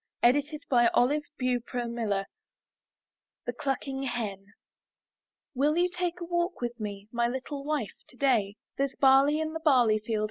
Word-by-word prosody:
82 290 Hz, +5 st, +3 dB, 0.2 s
IN 240 Hz, -1 st, +6 dB
THE 285 Hz, +5 st, +3 dB, 0.2 s
NURSERY 235 Hz, -4 st, -1 dB, 1.2 s
THE 245 Hz, -, -2 dB
CLUCKING 270 Hz, +1 st, -3 dB
HEN 225 Hz, -7 st, -3 dB, 1.1 s
''Will 295 Hz, +5 st, +2 dB
you 355 Hz, +1 st, +3 dB
take 355 Hz, -1 st, -2 dB
a 345 Hz, -, -5 dB
walk 345 Hz, +1 st, -1 dB
with 240 Hz, 0 st, -4 dB
me, 205 Hz, -1 st, -6 dB
My 235 Hz, 0 st, +1 dB
little 265 Hz, +3 st, -4 dB
wife, 290 Hz, -7 st, -2 dB
today? 245 Hz, -7 st, +1 dB, 0.2 s
There's 275 Hz, -1 st, 0 dB
barley 275 Hz, +3 st, +5 dB
in 315 Hz, 0 st, -2 dB
the 325 Hz, -, -3 dB
barley 250 Hz, -9 st, +4 dB
field. 215 Hz, 0 st, -2 dB
255 Hz, 140 wpm, -28 LUFS, 235-295 Hz, 1.2 s, IN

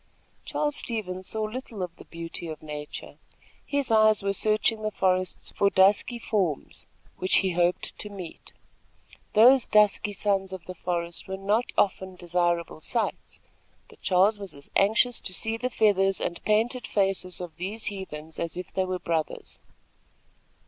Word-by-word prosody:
Charles 295 Hz, -1 st, -1 dB
Stevens 190 Hz, -5 st, -4 dB
saw 220 Hz, 0 st, -1 dB
little 215 Hz, -2 st, -5 dB
of 175 Hz, -1 st, -6 dB
the -, -, -13 dB
beauty 165 Hz, 0 st, -6 dB
of 155 Hz, -1 st, -7 dB
nature. 150 Hz, -1 st, -7 dB, 0.4 s
His 280 Hz, -4 st, -1 dB
eyes 215 Hz, -2 st, +5 dB
were 200 Hz, 0 st, +1 dB
searching 215 Hz, +2 st, +2 dB
the 215 Hz, -, 0 dB
forests 185 Hz, -2 st, -1 dB
for 200 Hz, -, +4 dB
dusky 200 Hz, +5 st, +4 dB
forms, 195 Hz, -10 st, -2 dB, 0.3 s
which 185 Hz, -, +1 dB
he 190 Hz, -, +2 dB
hoped 175 Hz, +1 st, +1 dB
to 210 Hz, -, -5 dB
meet. 185 Hz, -5 st, -9 dB, 0.8 s
Those 250 Hz, +4 st, +7 dB
dusky 210 Hz, -1 st, +4 dB
sons 195 Hz, -1 st, 0 dB
of 185 Hz, -3 st, -7 dB
the 185 Hz, -, -6 dB
forest 170 Hz, -1 st, -3 dB
were 190 Hz, 0 st, -4 dB
not 205 Hz, +5 st, 0 dB
often 190 Hz, -1 st, +1 dB
desirable 175 Hz, -2 st, -1 dB
sights; 230 Hz, +6 st, -2 dB, 0.5 s
but -, -, -18 dB
Charles 195 Hz, +3 st, +3 dB
was 200 Hz, -5 st, -8 dB
as 140 Hz, -, -14 dB
anxious 220 Hz, +4 st, +4 dB
to 185 Hz, -, -6 dB
see 225 Hz, 0 st, -2 dB
the 250 Hz, +2 st, -2 dB
feathers 195 Hz, -4 st, +3 dB
and 170 Hz, -, -2 dB
painted 230 Hz, +4 st, +1 dB
faces 195 Hz, -2 st, 0 dB
of 175 Hz, -3 st, -7 dB
these 200 Hz, +5 st, -4 dB
heathens, 160 Hz, -5 st, -8 dB
as 170 Hz, +1 st, -3 dB
if 180 Hz, -, -7 dB
they 190 Hz, -, +1 dB
were 185 Hz, 0 st, -2 dB
brothers. 165 Hz, -3 st, -3 dB
195 Hz, 155 wpm, -27 LUFS, 180-215 Hz, 0.8 s, Those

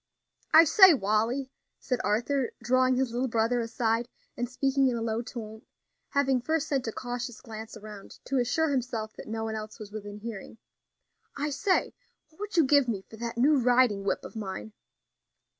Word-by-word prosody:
"I 320 Hz, -, +9 dB
say, 370 Hz, +1 st, +8 dB
Wally," 235 Hz, +5 st, 0 dB, 0.3 s
said 250 Hz, -2 st, -2 dB
Arthur, 245 Hz, +4 st, 0 dB
drawing 255 Hz, +2 st, +2 dB
his 255 Hz, -1 st, 0 dB
little 250 Hz, +2 st, 0 dB
brother 230 Hz, +1 st, +1 dB
aside 230 Hz, 0 st, -1 dB, 0.3 s
and 245 Hz, 0 st, -3 dB
speaking 270 Hz, +1 st, +1 dB
in 250 Hz, -, 0 dB
a 230 Hz, -, -3 dB
low 225 Hz, 0 st, -1 dB
tone, 220 Hz, -3 st, -8 dB, 0.5 s
having 270 Hz, -3 st, +2 dB
first 315 Hz, +3 st, -1 dB
sent 270 Hz, -5 st, -1 dB
a -, -, -1 dB
cautious 245 Hz, 0 st, -5 dB
glance 220 Hz, 0 st, -9 dB
around 210 Hz, -2 st, -11 dB
to 270 Hz, -1 st, 0 dB
assure 300 Hz, +6 st, +1 dB
himself 235 Hz, -5 st, -2 dB
that -, -, -9 dB
no 220 Hz, 0 st, -3 dB
one 220 Hz, 0 st, -3 dB
else 215 Hz, -1 st, -6 dB
was 215 Hz, -3 st, -10 dB
within 205 Hz, -1 st, -7 dB
hearing; 220 Hz, 0 st, -8 dB, 0.8 s
"I 295 Hz, +1 st, -1 dB
say, 370 Hz, +7 st, +1 dB, 0.4 s
what 315 Hz, -, -27 dB
would 415 Hz, -3 st, -5 dB
you 330 Hz, -, +7 dB
give 280 Hz, -1 st, +4 dB
me 205 Hz, -5 st, -2 dB
for 220 Hz, -, -10 dB
that 235 Hz, +1 st, -5 dB
new 280 Hz, +4 st, +4 dB
riding 245 Hz, -5 st, +3 dB
whip 200 Hz, -, -1 dB
of -, -, -10 dB
mine?" 210 Hz, 0 st, -6 dB
240 Hz, 180 wpm, -28 LUFS, 220-270 Hz, 0.8 s, I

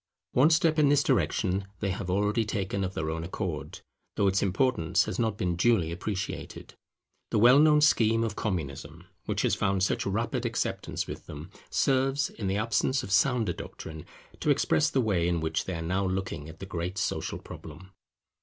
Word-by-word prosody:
One 135 Hz, +5 st, +5 dB
step 160 Hz, -1 st, +3 dB
in 145 Hz, -2 st, +5 dB
this 145 Hz, 0 st, +4 dB
direction 100 Hz, -7 st, 0 dB
they 100 Hz, -2 st, -1 dB
have 90 Hz, 0 st, -4 dB
already 105 Hz, +4 st, +1 dB
taken 100 Hz, -2 st, -2 dB
of 95 Hz, +1 st, -4 dB
their 80 Hz, 0 st, -2 dB
own 80 Hz, 0 st, -4 dB
accord, 85 Hz, -2 st, -5 dB, 0.3 s
though 100 Hz, -, +1 dB
its 95 Hz, 0 st, +2 dB
importance 95 Hz, -4 st, +2 dB
has -, -, -4 dB
not 110 Hz, -3 st, 0 dB
been 90 Hz, -3 st, -1 dB
duly 90 Hz, -3 st, +2 dB
appreciated. 100 Hz, +3 st, -5 dB, 0.6 s
The -, -, 0 dB
well 125 Hz, +6 st, +7 dB
known 150 Hz, 0 st, +5 dB
scheme 115 Hz, -6 st, +4 dB
of 110 Hz, -2 st, -2 dB
Communism, 80 Hz, -3 st, -4 dB, 0.2 s
which -, -, -1 dB
has -, -, +2 dB
found 95 Hz, -1 st, +1 dB
such 100 Hz, -, 0 dB
rapid 115 Hz, +5 st, -1 dB
acceptance 115 Hz, -2 st, -2 dB
with -, -, -8 dB
them, 75 Hz, +5 st, -9 dB, 0.2 s
serves, 135 Hz, +1 st, +1 dB
in 105 Hz, -, -5 dB
the 95 Hz, +1 st, 0 dB
absence 115 Hz, +4 st, +1 dB
of 95 Hz, -, -7 dB
sounder 125 Hz, 0 st, +2 dB
doctrine, 80 Hz, -1 st, -8 dB, 0.4 s
to -, -, -1 dB
express 155 Hz, 0 st, +3 dB
the 130 Hz, -, +1 dB
way 95 Hz, -7 st, +1 dB
in 85 Hz, -1 st, +1 dB
which 80 Hz, 0 st, -1 dB
they 95 Hz, -, -3 dB
are 80 Hz, -, -4 dB
now 95 Hz, +3 st, 0 dB
looking 95 Hz, -5 st, -3 dB
at 80 Hz, -, -11 dB
the 95 Hz, -, -7 dB
great 90 Hz, 0 st, -4 dB
social 95 Hz, -, -2 dB
problem. 95 Hz, +1 st, -11 dB
100 Hz, 185 wpm, -28 LUFS, 90-120 Hz, 0.6 s, well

